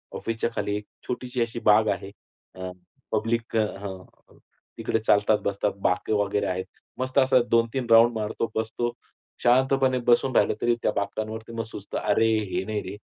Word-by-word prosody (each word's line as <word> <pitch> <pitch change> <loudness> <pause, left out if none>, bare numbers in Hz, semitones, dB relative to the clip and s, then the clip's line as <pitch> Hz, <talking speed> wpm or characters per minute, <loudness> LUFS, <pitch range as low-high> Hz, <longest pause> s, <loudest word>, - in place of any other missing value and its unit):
ऑफिसच्या 115 +1 -2
खाली 105 -1 -1
एक 105 - -8 0.2
छोटीशी 125 0 -3
अशी 115 0 -2
बाग 110 +1 +6
आहे. 95 0 -8 0.4
अ, 95 0 -5 0.4
पब्लिक 115 +1 -1
अ, - - +5 0.2
हं, 95 -2 -7 0.7
तिकडे 115 - 0
चालतात, 105 0 +3
बसतात, 100 +1 0
बाकं 90 +4 0
वगैरे 100 0 0
आहेत. 95 0 -2 0.3
मस्त 130 +1 -3
असं 130 -1 +5
2-3 115 +2 +1
राउंड 115 +1 +7
मारतो, 110 +1 -2
बसतो. 110 +2 -1 0.5
शांतपणे 130 +1 +3
बसून 120 +2 +3
राहिलं - - +4
तरी 120 0 +3
त्या - - +2
बाकांवरती 110 +2 -4
मग 115 0 -2
सुचतं, 100 - -6
"अरे, 105 +2 +2 0.2
हे - - -1
नाही 105 0 -2
रे, 95 - -6
110 Hz, 160 wpm, -25 LUFS, 105-120 Hz, 0.7 s, राउंड